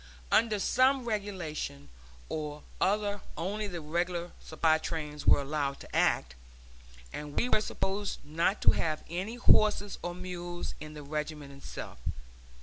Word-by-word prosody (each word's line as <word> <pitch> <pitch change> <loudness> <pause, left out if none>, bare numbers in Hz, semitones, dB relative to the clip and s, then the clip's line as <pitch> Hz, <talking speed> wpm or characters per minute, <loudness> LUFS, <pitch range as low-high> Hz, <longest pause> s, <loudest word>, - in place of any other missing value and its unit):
Under 220 -2 +4
some 260 +5 +4
regulation 180 - -3 0.4
or 150 -1 -4 0.2
other 205 0 +2 0.2
only 205 +5 -1
the 175 -4 -5
regular 175 +2 -1
supply 160 0 +2
trains 150 -2 -4
were - - +8
allowed 140 -1 -1
to - - -9
act, - - +3 0.8
and 150 -1 -6
we 245 - +3
were 215 - +4
supposed 200 -1 -1
not 165 +7 +1
to - - +8
have 155 -1 -1
any 190 +7 -2
horses 210 -4 +4
or 175 0 -3
mules 175 -1 -5
in 155 0 -8
the 150 - -7
regiment 150 -1 -4
itself. 140 - -8
175 Hz, 140 wpm, -31 LUFS, 150-205 Hz, 0.8 s, were